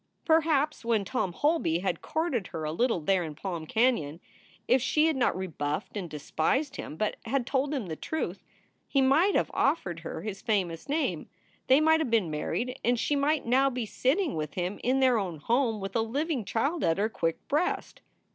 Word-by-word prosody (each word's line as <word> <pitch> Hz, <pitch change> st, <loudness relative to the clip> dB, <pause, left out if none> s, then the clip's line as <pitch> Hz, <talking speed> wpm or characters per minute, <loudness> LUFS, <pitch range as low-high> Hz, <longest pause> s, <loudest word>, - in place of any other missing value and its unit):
Perhaps 310 Hz, -3 st, +2 dB
when 225 Hz, -3 st, +1 dB
Tom 190 Hz, -2 st, -1 dB
Holby 290 Hz, -, +1 dB
had 175 Hz, -2 st, -2 dB
courted 310 Hz, -, -1 dB
her 160 Hz, -2 st, -6 dB
a 155 Hz, -, -2 dB
little 225 Hz, +1 st, +1 dB
there 185 Hz, +3 st, +2 dB
in 155 Hz, -2 st, -6 dB
Palm 170 Hz, -1 st, -5 dB
Canon, 195 Hz, -, +1 dB, 0.5 s
if 255 Hz, +1 st, +4 dB
she 300 Hz, +5 st, +2 dB
had 320 Hz, -2 st, +2 dB
not 245 Hz, -8 st, +1 dB
rebuffed 160 Hz, -1 st, -3 dB
and 185 Hz, -5 st, -4 dB
despised 160 Hz, -, -1 dB
him, 155 Hz, -, -7 dB
but 215 Hz, -, -1 dB
had 245 Hz, +2 st, 0 dB
told 270 Hz, +2 st, 0 dB
him 270 Hz, -8 st, -2 dB
the 160 Hz, -3 st, -5 dB
truth, 315 Hz, -, -4 dB, 0.4 s
he 275 Hz, -, +1 dB
might 295 Hz, +9 st, +4 dB
have -, -, +1 dB
offered 195 Hz, -, 0 dB
her 165 Hz, -, -6 dB
his 205 Hz, -2 st, -5 dB
famous 190 Hz, -, -1 dB
name; 310 Hz, +3 st, -1 dB, 0.4 s
they 265 Hz, +2 st, +6 dB
might 320 Hz, +1 st, +4 dB
have 310 Hz, -6 st, -1 dB
been 215 Hz, -8 st, +2 dB
married 245 Hz, -, -2 dB
and 240 Hz, 0 st, +2 dB
she 290 Hz, -, +1 dB
might 290 Hz, +2 st, +1 dB
now 265 Hz, +3 st, +4 dB
be 245 Hz, -3 st, -3 dB
sitting 290 Hz, -, 0 dB
with 155 Hz, -2 st, -4 dB
him 180 Hz, +2 st, -2 dB
in 260 Hz, +2 st, +2 dB
their 255 Hz, -3 st, +4 dB
own 180 Hz, -5 st, -3 dB
home 230 Hz, -, +1 dB
with 195 Hz, 0 st, -6 dB
a 225 Hz, -, +3 dB
living 270 Hz, -, -1 dB
child 280 Hz, -, -1 dB
at 165 Hz, -, +2 dB
her 205 Hz, +2 st, +2 dB
quick 165 Hz, -6 st, -3 dB
breast. 310 Hz, +5 st, -1 dB
235 Hz, 195 wpm, -28 LUFS, 180-280 Hz, 0.5 s, they